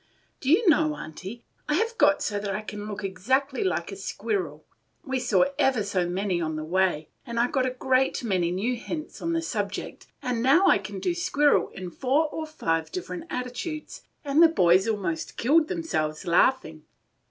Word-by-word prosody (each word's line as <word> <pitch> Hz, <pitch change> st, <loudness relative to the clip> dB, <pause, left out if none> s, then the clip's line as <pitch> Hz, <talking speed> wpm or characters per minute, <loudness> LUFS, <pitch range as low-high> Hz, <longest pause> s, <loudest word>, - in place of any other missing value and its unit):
"Do 265 Hz, -, -3 dB
you 370 Hz, +8 st, +4 dB
know, 305 Hz, -1 st, +4 dB
Aunty, 195 Hz, -, -8 dB, 0.3 s
I 300 Hz, -, +3 dB
have 455 Hz, +6 st, 0 dB
got -, -, +3 dB
so 205 Hz, -1 st, -1 dB
that 200 Hz, -1 st, -3 dB
I 210 Hz, -, -3 dB
can 210 Hz, -1 st, -7 dB
look 205 Hz, -1 st, -6 dB
exactly 260 Hz, +9 st, 0 dB
like 170 Hz, 0 st, -1 dB
a -, -, -6 dB
squirrel? 195 Hz, -6 st, -3 dB, 0.4 s
We 265 Hz, -1 st, -2 dB
saw 255 Hz, +2 st, +3 dB
every 255 Hz, -5 st, +3 dB
so 185 Hz, -3 st, -1 dB
many 185 Hz, -1 st, -1 dB
on 160 Hz, -1 st, -2 dB
the 155 Hz, -, -4 dB
way, 175 Hz, -2 st, 0 dB
and 235 Hz, 0 st, -4 dB
I 235 Hz, -, +4 dB
got 260 Hz, -1 st, 0 dB
a 255 Hz, -, -4 dB
great 260 Hz, 0 st, +1 dB
many 185 Hz, -6 st, +1 dB
new 205 Hz, +8 st, -1 dB
hints 305 Hz, +6 st, -6 dB
on 335 Hz, -, -1 dB
the 330 Hz, 0 st, 0 dB
subject, 205 Hz, -9 st, -4 dB
and 250 Hz, -4 st, -2 dB
now 280 Hz, +10 st, +5 dB
I -, -, +5 dB
can -, -, -7 dB
do 360 Hz, -2 st, 0 dB
squirrel 335 Hz, -5 st, +2 dB
in 185 Hz, -2 st, -8 dB
four 275 Hz, -, +1 dB
or 315 Hz, 0 st, -5 dB
five 165 Hz, -, -2 dB
different 355 Hz, -2 st, -5 dB
attitudes, 250 Hz, +6 st, -5 dB, 0.2 s
and 285 Hz, +3 st, +3 dB
the 335 Hz, -, +9 dB
boys 185 Hz, -, +4 dB
almost 185 Hz, -7 st, -2 dB
killed 305 Hz, +6 st, +3 dB
themselves 175 Hz, -, -2 dB
laughing. 170 Hz, -3 st, +2 dB
235 Hz, 185 wpm, -26 LUFS, 185-295 Hz, 0.4 s, the